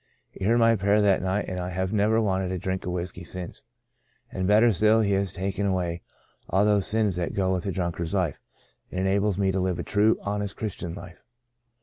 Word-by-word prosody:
He - - -6
heard 115 +3 +4
my 115 -1 +5
prayer 100 +1 +2
that 100 -2 +3
night 95 +2 -1
and 90 -1 -4
I 90 0 -3
have 95 +2 -2
never 110 +2 +3
wanted 95 -4 0
a 95 - -2
drink 95 +1 -3
of - - -1
whiskey 90 0 -5
since, 90 +1 -7 0.7
and 95 -1 -2
better 110 +3 +5
still 110 +3 +4
He 100 -2 +1
has 100 -2 +1
taken 100 +2 -2
away 90 -3 -1 0.5
all 95 +3 +3
those 105 -2 +2
sins 105 -4 0
that 90 - -2
go 95 -1 +1
with 90 +1 -2
a - - 0
drunkard's 85 0 -2
life, 90 -7 -1 0.5
and 90 - -4
enables 100 +1 +1
me 95 -1 +2
to 95 - -1
live 90 -1 0
a - - -3
true, 105 +2 +2
honest 100 0 -3
Christian 90 -5 -5
life. 90 0 -11
95 Hz, 215 wpm, -26 LUFS, 90-105 Hz, 0.7 s, my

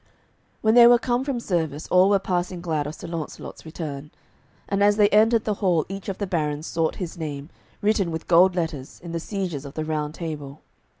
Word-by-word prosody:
When 220 0 +3
they 240 0 +9
were 240 0 +7
come 245 +1 0
from 270 -3 -2
service 160 -8 -2
all 185 +2 +5
were 200 - +5
passing 180 -1 -2
glad 160 -4 -2
of 150 - -6
Sir - - -10
Launcelot's 165 -1 -7
return. 150 -3 -6 0.6
And 200 0 -1
as 205 0 +5
they 205 -1 +5
entered 220 +2 +4
the 215 - 0
hall 175 -5 +2
each 195 +1 -6
of 195 - -4
the 200 - -2
barons 155 -4 -2
sought 165 -1 -1
his 175 -2 -6
name, 145 -1 -5 0.3
written 205 -4 +2
with 160 -1 -5
gold 180 +2 +5
letters, 160 -5 -4
in 170 - -7
the 170 - -2
sieges 180 -6 -4
of 140 0 -10
the 155 - -3
Round 155 -1 -2
Table. 150 -4 -6
170 Hz, 205 wpm, -24 LUFS, 155-200 Hz, 0.6 s, they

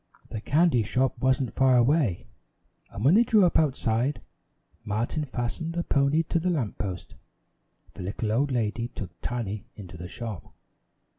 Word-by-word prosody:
The 110 - -5
candy 150 -1 +3
shop 125 +5 0
wasn't 130 -2 +1
far 130 -1 +4
away 120 - +2 0.6
and 105 - -5
when 145 - +6
they 220 - +7
drew 215 -4 +4
up 175 - +3
outside, 130 -3 +1 0.6
Martin 115 +9 -2
fastened 135 +6 -3
the 170 0 -1
pony 140 +3 +2
to 165 - -1
the 180 +2 0
lamp 140 - -2
post. 95 -3 -5 0.8
The - - -9
little 105 +4 -3
old 135 +5 +1
lady 115 -1 -1
took 100 -5 -7
Tiny 110 -4 -4
into 90 -4 -10
the 90 +1 -7
shop. 110 -1 -7
125 Hz, 155 wpm, -27 LUFS, 110-150 Hz, 0.8 s, they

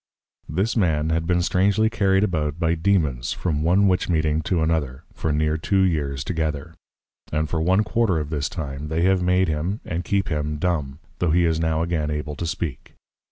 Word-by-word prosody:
This 95 +8 0
Man 80 -7 +1
has 80 0 +1
been 85 +1 +1
strangely 100 +5 +2
carried 100 -3 +2
about 80 -6 -1
by 85 -1 +1
Dæmons, 80 -9 0
from 75 -5 -1
one 90 +5 +3
Witch 90 -1 +1
meeting 80 -2 +1
to 85 -4 +2
another, 75 -5 -1
for 80 - -2
near 75 +1 +1
two 95 +4 +1
years 70 -7 0
together; 80 -1 -3 0.6
and 75 +1 0
for 80 +1 -2
one 95 +5 +3
quarter 110 -4 +1
of 75 -1 -3
this 70 -2 -1
time, 75 -3 -5
they 80 +2 -1
have 95 0 +3
made 90 +1 +2
him, 80 +7 -2
and 85 +1 -3
keep 100 0 0
him 75 -1 -2
Dumb, 75 -5 -1 0.2
tho' 90 - +1
he 85 +2 +3
is 80 -1 +1
now 80 0 +1
again 80 -3 -1
able 75 0 -3
to 85 - -3
speak. 80 -5 -5
80 Hz, 195 wpm, -23 LUFS, 75-90 Hz, 0.6 s, one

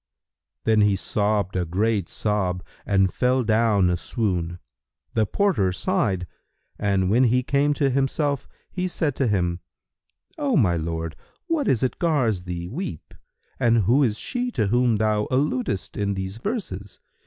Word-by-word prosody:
Then 110 -1 +3
he 105 -1 +4
sobbed 100 +1 0
a 90 - +1
great 100 +2 0
sob 95 -4 -1 0.2
and 95 -2 +3
fell 125 0 +2
down 110 -4 +3
a - - +2
swoon. 90 -5 -2 0.6
The 110 -2 +2
porter 180 - +1
sighed, 90 +1 0 0.5
and 100 -2 +1
when 125 +4 +5
he 125 +2 +2
came 140 +3 +2
to 140 -1 +2
himself, 140 +1 0 0.2
he 185 -1 -2
said 160 -5 -1
to 135 - +1
him, 90 -4 0 0.8
"O 280 -6 +1
my 90 -9 +3
lord, 80 0 -3 0.3
what 330 -5 0
is 120 - +2
it 130 - -1
gars 125 - +1
thee 85 -1 -4
weep 125 - -6 0.5
and 115 -3 +3
who 120 +9 +4
is 115 -6 +2
she 250 -1 -2
to 110 - +1
whom 120 0 +3
thou 105 0 +1
alludest 130 -7 -1
in 100 -1 -1
these 95 +2 -4
verses? 110 - -5
110 Hz, 155 wpm, -24 LUFS, 95-130 Hz, 0.8 s, when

